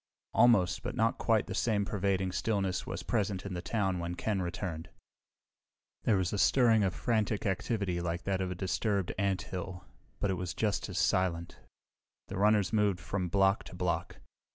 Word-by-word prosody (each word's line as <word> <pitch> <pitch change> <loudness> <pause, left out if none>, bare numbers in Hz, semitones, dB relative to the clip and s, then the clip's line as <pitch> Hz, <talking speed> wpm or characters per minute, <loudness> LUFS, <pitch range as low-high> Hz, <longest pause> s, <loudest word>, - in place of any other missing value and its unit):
Almost, 110 -5 +4
but 120 - -4
not 115 -1 +1
quite 110 -2 +2
the - - -5
same 105 -4 +1
pervading 95 -2 0
stillness 95 -1 -1
was - - -4
present 100 -5 -1
in 100 - -4
the 90 - -3
town 95 -3 -1
when 85 +1 -3
Ken 100 0 -1
returned. 85 -2 -4 1.2
There 110 - +4
was 95 0 -1
a 100 - -1
stirring 115 0 +4
of 95 -3 0
frantic 110 -2 0
activity 95 -2 -1
like 85 0 -3
that 95 -1 -1
of 95 - -1
a 90 - -4
disturbed 95 +1 -1
anthill, 95 -2 -2 0.3
but 100 - +1
it 95 - -1
was 90 -2 -4
just 105 -2 -1
as 95 - -5
silent. 85 -1 0 0.7
The - - -4
runners 105 -1 +3
moved 105 -4 +2
from 90 +2 -2
block 95 +2 +3
to - - -10
block. 90 -1 -2
95 Hz, 175 wpm, -31 LUFS, 90-105 Hz, 1.2 s, Almost